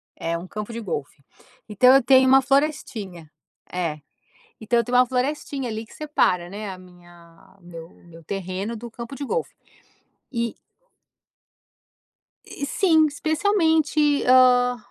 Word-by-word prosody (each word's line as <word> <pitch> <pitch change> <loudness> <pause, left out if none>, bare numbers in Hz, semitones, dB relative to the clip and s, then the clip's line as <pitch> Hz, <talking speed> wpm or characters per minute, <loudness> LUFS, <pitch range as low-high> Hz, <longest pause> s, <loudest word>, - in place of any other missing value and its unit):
é 170 0 -3
um 175 - -9
campo 210 +4 -7
de 230 - -5
golfe, 145 -8 -6 0.4
então 250 +5 +5
eu 270 - +4
tenho 260 0 +5
uma 265 +1 +6
florestinha 225 - -2 0.4
é. 170 -4 -3 0.6
Então 235 +2 +1
eu 235 - +1
tenho 245 +2 0
uma 250 - +6
florestinha 265 0 -3
ali 220 +1 -5
que - - -18
separa, 185 - 0
né, 205 +1 -6
a 185 - -9
minha 175 -1 -19
o - - -25
meu 165 -2 -10
o 175 - -22
meu 165 -1 -15
terreno, 195 +5 -5
do 235 +2 -8
campo 235 +3 -9
de 285 - -6
golfe. 480 - -3 0.8
E 235 -2 -2 1.9
E, 280 - -6
sim. 320 -1 +3
Especialmente, 315 -2 +1
hã, 250 -1 +5
235 Hz, 145 wpm, -23 LUFS, 180-275 Hz, 1.9 s, uma